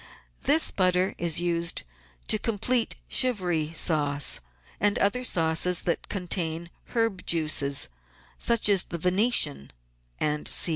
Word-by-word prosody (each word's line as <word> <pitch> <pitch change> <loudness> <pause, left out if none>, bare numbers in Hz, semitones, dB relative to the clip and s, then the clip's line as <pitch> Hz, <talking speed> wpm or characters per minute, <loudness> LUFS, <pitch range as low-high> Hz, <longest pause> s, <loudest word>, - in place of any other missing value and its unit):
This 310 +3 +3
butter 185 0 +1
is 170 -2 +2
used 170 -1 0 0.4
to 215 - +2
complete 230 +2 0
Chivry 180 - +1
sauce 145 -4 +1 0.4
and 205 0 +2
other 225 +5 0
sauces 170 -3 +1
that 170 - -2
contain 170 -3 -3 0.2
herb 225 -5 0
juices, 155 -4 +2 0.5
such 235 -3 +1
as 200 -3 +3
the 170 - -7
Venetian, 180 - +2 0.5
&c. 150 +3 +1
180 Hz, 110 wpm, -26 LUFS, 160-205 Hz, 0.5 s, This